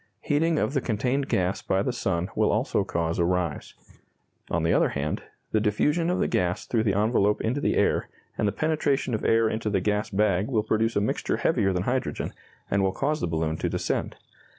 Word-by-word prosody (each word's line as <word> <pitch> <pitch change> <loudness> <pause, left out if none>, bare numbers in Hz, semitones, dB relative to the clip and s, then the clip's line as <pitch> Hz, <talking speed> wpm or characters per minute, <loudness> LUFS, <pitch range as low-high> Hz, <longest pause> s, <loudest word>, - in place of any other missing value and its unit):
Heating 160 +2 +1
of 140 - 0
the 135 - +1
contained 125 +5 -1
gas 90 +1 0
by 95 +1 0
the 125 - -1
sun 90 -6 -1
will - - +2
also - - +1
cause 85 0 -2
a - - +4
rise. 90 -2 -1 0.7
On 85 -1 0
the 80 - +2
other - - +3
hand, 75 +2 -2 0.3
the 110 - +3
diffusion 150 +11 +1
of 180 - +1
the - - +1
gas 90 0 0
through 115 -2 0
the 100 -2 +2
envelope 105 -1 +2
into 125 +6 -1
the - - +1
air, - - +1 0.3
and 105 - 0
the - - +2
penetration 145 -1 0
of 110 - -2
air 115 0 +3
into 110 0 -2
the 100 -2 +1
gas 105 +3 0
bag 100 -1 +1
will 115 -5 +1
produce 110 +1 0
a 100 - +2
mixture 105 - -1
heavier 95 - +2
than 90 -1 -1
hydrogen, 130 +4 -2 0.4
and 100 - +2
will 95 -1 +1
cause 150 +2 -1
the - - 0
balloon 80 -1 -1
to - - -1
descend. - - -2
105 Hz, 210 wpm, -26 LUFS, 95-125 Hz, 0.7 s, a